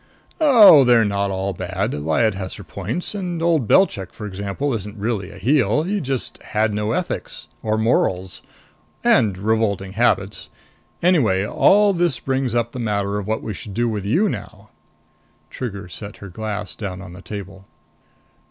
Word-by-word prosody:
"Oh, 225 - +8
they're 120 -3 +5
not 100 -1 0
all 95 0 -2
bad. 95 +2 -3
Lyad 80 +10 +1
has 95 -1 -6
her 105 - -10
points. 100 - -4
And 180 -4 -3
old 165 -7 +1
Belchik, 100 - +3
for 105 - -8
example, 100 +8 -3
isn't 105 -1 -5
really 105 -2 -2
a - - -12
heel. 135 0 +2
He 200 +3 -1
just 135 -3 -4
had 110 0 0
no 105 +1 -1
ethics. - - -4 0.2
Or 110 0 0
morals. 95 -5 0 0.6
And 100 -4 +3
revolting 100 -2 0
habits. 100 -4 0 0.5
Anyway, 120 - +3
all 205 - +4
this 170 -7 +1
brings 130 -1 -1
up 115 0 0
the 125 - -7
matter 100 -3 -1
of 100 - -6
what 110 +1 -2
we 110 - -4
should 100 0 -9
do 120 +1 +1
with 105 -3 -3
you 175 - +3
now." - - -7 0.8
Trigger 100 -7 -6
set 100 +4 -9
her 100 - -10
glass 105 +1 -5
down 95 -4 -6
on 90 -2 -10
the 90 - -11
table. 95 -1 -8
105 Hz, 165 wpm, -21 LUFS, 100-125 Hz, 0.8 s, Oh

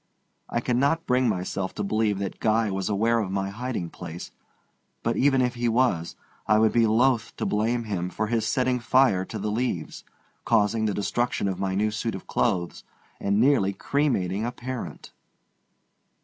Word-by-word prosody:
I 120 - -1
cannot 140 +7 +1
bring 125 -1 +2
myself 95 -1 -3
to 105 - -2
believe 105 0 +1
that 100 -1 -4
Guy 110 -1 +2
was 95 0 -2
aware 115 +3 +2
of 105 -4 -2
my 95 0 -2
hiding 110 -5 -4
place, 85 +2 -8 0.7
but - - 0
even 135 -1 +3
if 125 -1 0
he 120 -1 0
was, 115 -9 +1 0.3
I 110 - +5
would 110 0 +4
be 115 -1 +3
loath 115 +1 +2
to - - -3
blame 115 +3 0
him 95 -5 -3
for 110 - -2
his 115 0 0
setting 125 -1 +1
fire 120 -6 +3
to - - -6
the 105 - -2
leaves, 110 -8 -3 0.4
causing 110 0 +2
the 105 -3 0
destruction 105 +2 -1
of 95 -1 -2
my 95 -1 -1
new 105 +2 +1
suit 110 0 -3
of 95 - -8
clothes, 90 -7 -1 0.4
and 100 +1 +1
nearly 120 -6 +3
cremating 105 -5 0
a 120 - -1
parent. 125 0 -7
110 Hz, 175 wpm, -26 LUFS, 100-120 Hz, 0.7 s, I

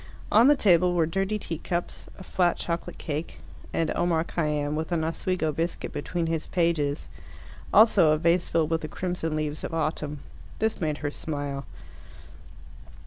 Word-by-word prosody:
On 225 +4 +7
the 290 - +7
table 180 - +4
were 165 -2 +3
dirty 195 +5 -1
teacups, 175 -1 -4
a 190 - -10
flat 180 -2 +1
chocolate 170 0 -3
cake, 155 +2 -4 0.3
and 165 -1 0
Omar 170 -2 +2
Khayyam, 150 -3 -1
with 160 +3 -3
an 165 -2 +1
Oswego 165 0 -1
biscuit 165 +3 -3
between 170 +3 -2
his 165 -1 -2
pages. 165 -5 0 0.6
Also 210 -7 +6
a 155 - +3
vase 170 +2 +2
filled 160 -1 +1
with 165 0 +1
the 155 - -4
crimson 170 -1 -3
leaves 155 -1 -3
of 165 - -3
autumn. 150 -2 -2 0.4
This 220 -2 -1
made 155 -3 0
her 145 - 0
smile. 145 -3 -4
165 Hz, 155 wpm, -27 LUFS, 155-175 Hz, 0.6 s, On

